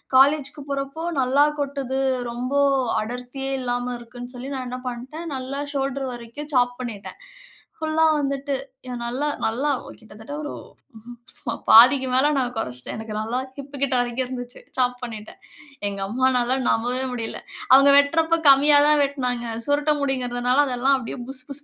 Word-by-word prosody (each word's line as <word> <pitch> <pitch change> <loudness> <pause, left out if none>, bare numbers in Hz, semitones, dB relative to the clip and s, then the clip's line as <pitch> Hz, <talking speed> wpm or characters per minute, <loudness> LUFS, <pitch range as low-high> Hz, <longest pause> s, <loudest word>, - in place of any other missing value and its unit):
காலேஜுக்கு 285 +2 +4
போறப்போ 275 +3 -4
நல்லா 265 +2 +3 0.2
கொட்டுது. 275 -2 -2 0.3
ரொம்ப 245 +3 -4 0.5
அடர்த்தியே 250 +4 -5
இல்லாம 245 0 -2
இருக்குன்னு 245 +1 -10
சொல்லி, 255 +2 -7
நான் 260 -1 -4
என்ன 250 - -5
பண்ட்டேன், 260 +8 -6
நல்லா 265 +2 -5
ஷோல்டர் 275 0 -2
வரைக்கும் 240 +6 -8
சாப் 245 -1 +3
பண்ணிட்டேன். 230 -5 -7 0.6
ஃபுல்லா 315 0 +1
வந்துட்டு 275 0 -2 0.3
ஏன் 245 -1 -5
நல்லா 255 +5 -1 0.2
நல்லா 250 +7 0 0.3
கிட்டத்தட்ட 220 +4 -11
ஒரு 295 - -5 1.2
பாதிக்கு 260 +4 +8
மேல 290 +3 +4
நான் 250 -1 -1
கொறச்சுட்டேன். 125 - -4
எனக்கு 220 -1 -7
நல்லா 230 +3 -2 0.2
ஹிப் 280 0 -9
கிட்ட 275 -1 0
வரைக்கும் 245 +1 -1
இருந்துச்சு. 245 -1 -7 0.2
சாப் 250 -1 0
பண்ணிட்டேன். 220 -3 -8 0.5
எங்க 200 -1 -6
அம்மானால 255 +2 +1
நம்பவே 245 +3 0
முடில. 230 -2 -4 0.4
அவங்க 275 +1 +7
வெட்றப்போ 325 +3 +3
கம்மியாதான் 290 +2 +6
வெட்னாங்க. 250 -4 -2 0.2
சுருட்ட 290 +1 +2
முடிங்குறதுனால 250 0 +1
அது 250 -2 -2
எல்லாம் 270 +2 +4
அப்டியே 250 0 -6
புஸ் 260 -1 -2
புஸ் 280 +1 -1
260 Hz, 140 wpm, -23 LUFS, 245-280 Hz, 1.2 s, பாதிக்கு